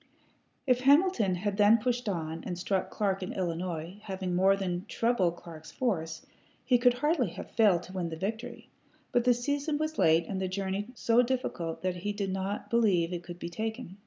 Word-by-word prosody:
If 250 -2 +3
Hamilton 275 - +4
had 200 +2 -2
then 210 +2 +6
pushed 245 0 -1
on 165 -3 -3
and 175 - -4
struck 190 +1 -1
Clark 195 -2 -1
in 185 - -4
Illinois, 175 0 -3
having 190 -2 -3
more 190 +2 +4
than 185 -2 -3
treble 230 -7 +1
Clark's 165 -2 -11
force, 165 -11 -2 0.4
he 250 -2 +4
could 245 0 +4
hardly 295 - +1
have - - -8
failed 200 -7 +4
to 185 - -11
win 180 -3 -2
the 160 - -5
victory; 220 +8 -5 0.4
but 240 0 +2
the 250 -1 +5
season 285 +4 -1
was 310 +1 -3
late 165 +1 +4
and 190 -1 -3
the 190 - 0
journey 195 +2 -2
so 230 +1 +3
difficult 235 -11 -2
that 185 -1 -1
he 205 +4 -3
did 200 -2 -2
not 195 +2 -3
believe 190 -7 +2
it 175 - -3
could 175 0 -9
be 170 - -6
taken. 220 +1 -5
195 Hz, 190 wpm, -29 LUFS, 175-235 Hz, 0.4 s, then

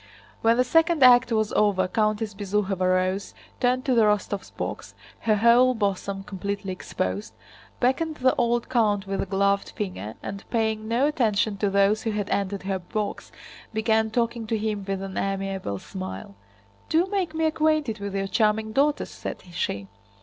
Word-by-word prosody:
When 230 +1 +4
the 250 - +4
second 325 +3 +3
act 245 -1 +7
was 215 -2 +1
over 195 -3 +2
Countess 215 +1 0
Bezúkhova 195 -2 0
rose, 185 +2 0 0.2
turned 255 +1 +1
to 260 - +2
the 235 - +4
Rostóvs' 210 -2 0
box—her 220 -2 -3
whole 240 +4 +5
bosom 200 -2 -2
completely 200 0 -4
exposed—beckoned 180 - -3
the 260 -2 +3
old 235 0 0
count 215 -5 +1
with 195 0 -2
a - - -3
gloved 200 +1 +1
finger, 185 - -5
and 200 0 -6
paying 220 -2 0
no 235 +5 +2
attention 225 -8 +1
to 205 0 +1
those 200 +2 +3
who 225 - -2
had 210 -2 -2
entered 200 0 -1
her 190 0 -2
box 205 +3 -4 0.4
began 220 0 +2
talking 230 0 -1
to 225 - 0
him 210 -1 -2
with 195 0 -2
an 195 -1 -4
amiable 195 - -2
smile. 95 +1 -7 0.6
"Do 330 +3 +3
make 380 -4 -2
me 320 0 +1
acquainted 310 -7 +1
with 200 -1 -5
your 195 0 0
charming 215 +1 +1
daughters," 285 +5 +1
said - - -7
she. 100 - -3
210 Hz, 160 wpm, -25 LUFS, 195-235 Hz, 0.6 s, act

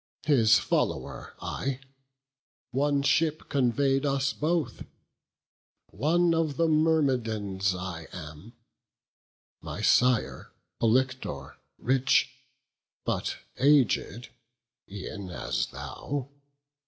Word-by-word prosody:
His 115 -7 +5
follower - - -2
I; 135 -1 -3 0.9
one 140 +1 +1
ship 155 +1 +1
convey'd 135 +1 +2
us 140 -1 +1
both; 160 0 -1 1.1
One 170 +3 +2
of 160 -4 0
the 165 - +3
Myrmidons 120 - +1
I 90 -3 -6
am; 80 +6 -10 1.1
my - - -6
sire 125 -2 +2 0.3
Polyctor, 125 - 0 0.2
rich, 130 +2 +2 0.7
but - - -1 0.2
aged, 130 -4 +2 0.6
e'en 100 0 -6
as 90 - -2
thou. 140 -2 -5
130 Hz, 80 wpm, -28 LUFS, 110-145 Hz, 1.1 s, His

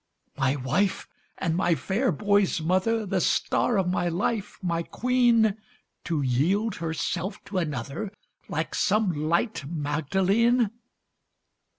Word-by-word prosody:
My 135 0 +1
wife 145 +9 0 0.3
and 165 -3 -1
my 175 -1 +2
fair 205 +9 0
boy's 200 +2 +2
mother 190 +7 +1
The 190 - 0
star 235 - +1
of 190 -2 +1
my 175 -1 0
life 200 +4 -2
my 170 -2 0
queen 235 0 +2 0.5
To 160 -4 -1
yield 185 - +1
herself 170 +4 -3
to 195 -2 -2
another 150 - -4 0.4
Like - - -2
some 210 -1 +2
light 165 +6 0
Magdalene! 190 - +1
185 Hz, 115 wpm, -26 LUFS, 160-210 Hz, 0.5 s, my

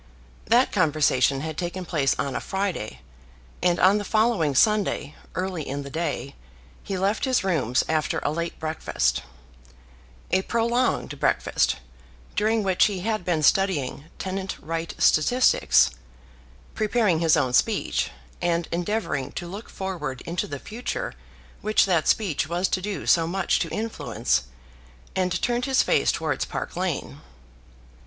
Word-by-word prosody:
That 240 +3 +4
conversation 145 -6 +2
had 155 0 -4
taken 180 +1 -3
place 150 -6 +1
on 140 -2 -2
a - - -2
Friday, 190 - -3 0.6
and 175 -1 +2
on 195 +3 +5
the - - -3
following 215 - +2
Sunday, 200 -6 +2 0.2
early 185 -2 -2
in 140 0 -4
the 140 - -9
day, 160 -3 -3 0.5
he 195 - -4
left 200 +6 +1
his 260 -5 +2
rooms 135 - +1
after 155 -1 0
a 145 - +1
late 170 +2 -4
breakfast, 155 - 0 1.1
a 190 - +3
prolonged 235 +4 0
breakfast, - - +2 0.6
during 220 +1 +2
which 190 -2 +4
he 200 -4 -1
had 215 -1 -1
been 170 -3 0
studying 150 -6 +2
tenant 190 0 -4
right 165 +1 -4
statistics, 245 +12 +4 0.8
preparing 215 -6 +2
his 165 -2 +4
own 125 -1 +1
speech, - - +1 0.3
and 170 -1 0
endeavouring 170 -6 -2
to 175 - -5
look 200 +6 -8
forward 165 -10 -4
into 170 +1 -3
the 145 - -5
future 225 - -4 0.5
which 215 0 +3
that 175 -5 +1
speech 190 -9 +1
was 175 +2 +1
to 185 - 0
do 205 +1 -4
so 165 -1 +4
much 190 +1 +1
to - - -1
influence, 215 - -1 0.7
and 185 -2 0
turned 240 0 +1
his 265 -1 +3
face - - +3
towards - - -1
Park - - -5
Lane. - - -3
180 Hz, 140 wpm, -25 LUFS, 155-205 Hz, 1.1 s, on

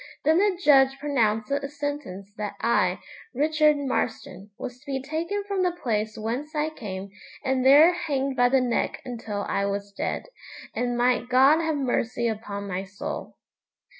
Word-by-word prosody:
Then 315 +4 +4
the 395 -3 +2
judge 270 -5 +5
pronounced 225 -7 0
the 280 0 -1
sentence 285 -10 -5
that 210 -1 -5
I, 185 -6 +2 0.4
Richard 300 +1 +3
Marston, 225 -7 -3
was 245 0 -7
to 285 - -24
be 270 -1 -1
taken 325 +9 -3
from 400 -1 -2
the 360 -1 +2
place 220 -8 -2
whence 250 +8 -4
I 305 +1 0
came, 195 -8 -7 0.3
and 260 -1 +1
there 295 +6 +7
hanged 275 -6 -2
by 245 -1 +4
the 265 0 +3
neck 245 -2 -1
until 225 -5 -4
I 200 0 0
was 200 0 -3
dead. - - -3 0.5
'And 245 0 -1
might 245 0 +2
God 270 +5 +6
have 320 -1 0
mercy 240 -3 0
upon 205 -2 -4
my 185 0 -3
soul!' 195 +1 -6
255 Hz, 165 wpm, -25 LUFS, 215-295 Hz, 0.5 s, there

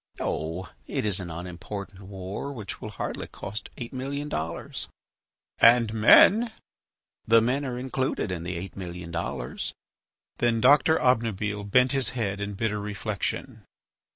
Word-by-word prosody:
"Oh! 80 +4 -2 0.2
it - - -2
is 100 -2 +2
an 90 -2 -5
unimportant 90 +3 -7
war 95 +6 -6
which 110 -7 -7
will 110 - -5
hardly 105 - -4
cost 105 +4 -6
eight 120 +1 -6
million 140 +3 -3
dollars." 80 - -4 0.7
"And 115 -2 +6
men.. 205 - +7 0.4
." - - -49
"The 115 +1 +7
men 125 +5 +1
are 125 -2 -3
included 130 -5 -1
in 85 -2 -3
the 85 +1 -4
eight 95 +3 -7
million 90 -2 -7
dollars." 70 -7 -3 0.6
Then 120 -1 +2
Doctor 145 +6 +6
Obnubile 105 -4 +1
bent 125 +4 +5
his 135 -5 +2
head 100 -3 -1
in 100 0 -3
bitter 105 0 -1
reflection. 105 0 -3
105 Hz, 145 wpm, -27 LUFS, 95-125 Hz, 0.7 s, men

